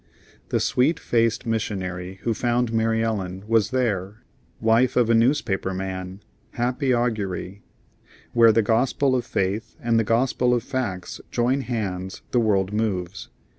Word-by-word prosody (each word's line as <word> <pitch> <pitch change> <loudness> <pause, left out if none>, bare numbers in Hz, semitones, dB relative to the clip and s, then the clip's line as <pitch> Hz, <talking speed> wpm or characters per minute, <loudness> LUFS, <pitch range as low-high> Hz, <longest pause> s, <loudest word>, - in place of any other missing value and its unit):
The - - +1
sweet 155 +7 +2
faced 115 0 +1
missionary 95 -5 -3
who 115 - +1
found 120 +1 0
Mary 115 0 +1
Ellen 95 -4 -3
was 110 -2 +3
there, 105 -5 -2 0.4
wife 115 +3 +3
of 120 -2 +3
a - - +5
newspaper 115 -6 +1
man 95 0 -5 0.3
happy 125 +3 0
augury; 105 -5 -1 0.7
where 115 -1 +7
the 115 +1 +3
gospel 130 +4 +2
of 125 - -2
faith 100 +3 -2
and 115 -1 +2
the - - +2
gospel 125 +2 +2
of 120 - -1
facts 105 -10 -4
join 125 +3 +1
hands 95 -7 -4
the 125 - +3
world 100 -3 +1
moves. 100 -4 -2
115 Hz, 140 wpm, -24 LUFS, 95-120 Hz, 0.7 s, where